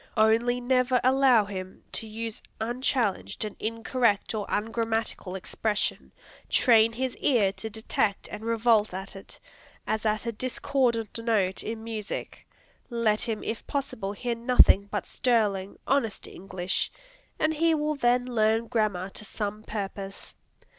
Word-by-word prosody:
Only 230 +3 +4
never 255 0 +2
allow 260 -4 +5
him 185 -2 -7
to 225 - -4
use 225 0 -5 0.2
unchallenged 235 -2 -1
an 210 - -6
incorrect 230 -1 0
or 210 -2 -3
ungrammatical 225 -3 -1
expression, 210 +3 -2 0.4
train 230 -3 +5
his 255 +2 -2
ear 220 -8 +3
to 220 - -6
detect 220 -2 -1
and - - -7
revolt 225 -3 +2
at 195 +1 -6
it, 195 - -10 0.5
as 220 - -1
at 215 +1 0
a 235 - -1
discordant 245 -1 0
note 210 -5 +1
in 220 0 -5
music, 220 -2 -5 0.4
let 230 -3 +1
him 225 -3 -1
if 225 - -4
possible 220 -8 -3
hear 240 +4 -2
nothing 230 -4 +5
but 205 -1 -2
sterling, 205 -6 0
honest 255 -6 0
English, 185 -1 -3 0.5
and 310 0 +2
he 325 +1 +3
will 300 0 0
then 245 -3 +2
learn 225 -2 +2
grammar 210 -5 0
to - - -9
some 210 0 -4
purpose. 195 -2 -6
225 Hz, 135 wpm, -27 LUFS, 210-245 Hz, 0.5 s, allow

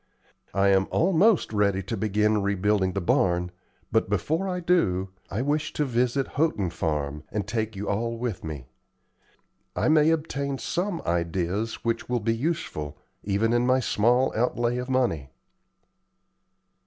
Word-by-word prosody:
I 100 0 +4
am 95 0 +3
almost 185 - +3
ready 100 -2 +1
to 95 - -3
begin 105 0 +1
rebuilding 100 -1 +1
the 100 - -1
barn; 90 0 +1 0.4
but - - +2
before 170 +5 0
I 180 -1 -2
do 105 - +1 0.2
so, - - -7
I 120 - 0
wish 150 +2 -1
to 150 - 0
visit 125 +1 +1
Houghton 130 - 0
Farm, 75 -3 -2
and 105 -1 -2
shall 105 - -5
take 110 -1 -3
you 100 +1 -5
all 115 +3 -1
with 115 -4 -4
me. 75 -5 -6 1.1
I - - +1
may 155 0 +5
obtain 140 -4 -1
some 180 +4 -2
ideas 85 +5 -1
which 115 +1 -1
will 125 -1 +1
be 115 +1 0
useful, 115 - -3 0.3
even 105 +3 +1
in 120 +1 +2
my 130 +1 +4
small 120 +2 +2
outlay 120 +1 0
of 125 +1 -5
money." 115 - 0
115 Hz, 155 wpm, -26 LUFS, 95-135 Hz, 1.1 s, may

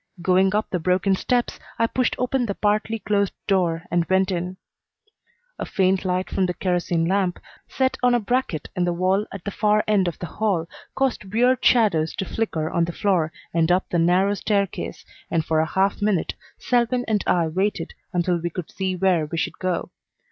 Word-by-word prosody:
Going 185 +3 +3
up 215 - +1
the 180 - 0
broken 185 +3 +2
steps, 245 +5 -1 0.2
I 230 - +3
pushed 250 +1 0
open 250 -1 0
the 200 - -2
partly 215 +2 0
closed 200 -2 0
door 175 -4 +1
and 175 0 +2
went 190 +1 +2
in. 180 +1 -3 1.0
A - - -2
faint 190 -2 +1
light 185 0 0
from 185 -1 0
a 180 - -2
kerosene 175 -2 0
lamp, 185 0 0 0.3
set 260 -1 0
on 245 -1 +4
a - - +3
bracket 225 - -1
in 180 - +1
the 175 0 +1
wall 185 +4 +1
at 195 -3 -8
the 200 - -2
far 210 +1 +2
end 200 -4 +3
of 175 - -3
the - - -5
hall, 185 -4 -1 0.3
caused 265 -5 0
weird 245 +4 +2
shadows 195 -10 +3
to 195 - -3
flicker 170 -7 -2
on 170 +1 +1
the 170 - -4
floor 170 -4 +1 0.2
and 165 0 +2
up 185 +1 +1
the 175 - +2
narrow 180 +4 +3
staircase, 200 -1 -2 0.2
and 165 -2 0
for 160 -1 +1
a 160 - +1
half 195 +4 +1
minute 205 -5 +1 0.2
Selwyn 245 0 +1
and 215 -2 +1
I 175 -2 +3
waited 185 +1 -1 0.2
until 175 0 +1
we 175 - -1
could 170 -1 -6
see 190 -1 -2
where 180 -4 +2
we 165 - -5
should - - -2
go. 185 -2 -2
190 Hz, 195 wpm, -23 LUFS, 175-210 Hz, 1.0 s, on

